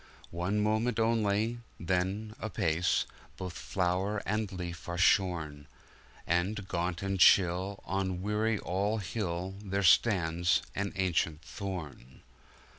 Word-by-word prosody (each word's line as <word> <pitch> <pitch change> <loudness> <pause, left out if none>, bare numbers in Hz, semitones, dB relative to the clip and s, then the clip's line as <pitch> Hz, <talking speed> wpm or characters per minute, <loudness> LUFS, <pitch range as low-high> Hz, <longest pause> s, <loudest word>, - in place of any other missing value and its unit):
One 90 +5 -1
moment 110 +3 +1
only 110 0 +1
— - - -32
then, 95 +5 -1
apace, 90 -6 +1 0.3
Both 90 -2 -5
flower 95 +5 -1
and 105 0 -1
leaf 85 -2 -6
are 85 - -3
shorn; 85 -6 +2 0.6
And, 95 +4 0
gaunt 85 0 -2
and 95 -1 -1
chill, 95 +2 +5
on 95 -1 -2
Weary 105 +2 +1
All 100 +4 -1
Hill, 95 -2 -3
There 100 0 -1
stands 85 -3 +4
an 100 0 -2
ancient 85 -4 0
thorn! 80 - -7
95 Hz, 115 wpm, -31 LUFS, 85-105 Hz, 0.6 s, chill